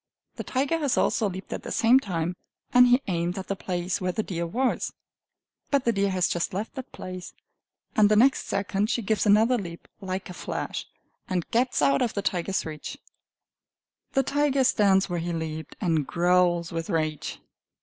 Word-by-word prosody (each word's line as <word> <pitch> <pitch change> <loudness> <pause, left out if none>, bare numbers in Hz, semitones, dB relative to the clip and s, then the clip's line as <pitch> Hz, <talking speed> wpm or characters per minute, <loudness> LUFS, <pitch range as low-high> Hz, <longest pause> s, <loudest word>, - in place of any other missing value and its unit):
The - - -4
tiger 275 +5 0
has 285 -5 0
also 215 -3 +2
leaped 190 +1 -7
at - - -4
the - - -7
same 240 +3 +5
time, 175 -6 -2 0.4
and 250 0 +8
he 250 +3 +4
aimed 175 -1 -1
at 190 - -6
the 195 - 0
place 180 -1 -2
where 185 0 0
the 220 - -2
deer 170 -3 -3
was. 250 +9 -1 0.8
But 280 -2 +1
the 235 - +4
deer 200 -2 +1
has 185 -2 +2
just 175 +1 -2
left 210 +3 -3
that 265 -2 -8
place, 185 -1 -8 0.6
and 210 -1 +5
the 215 - +4
next 265 +5 +4
second 200 +1 -1
she 240 -1 0
gives 215 +1 +1
another 225 +4 +5
leap, 170 -3 -8
like 190 0 -4
a 180 - -8
flash, - - -4 0.4
and 180 -2 -1
gets 245 - +2
out 140 0 +3
of 235 - 0
the 200 - -1
tiger's 185 +1 -1
reach. 155 -2 -6 1.2
The 270 - +3
tiger 280 0 +2
stands 195 -5 +4
where 175 -2 -2
he 170 +1 -3
leaped, 160 -2 -5
and 160 -7 +1
growls 175 -1 +2
with 165 +1 -4
rage. 155 -4 -2
190 Hz, 185 wpm, -26 LUFS, 175-230 Hz, 1.2 s, and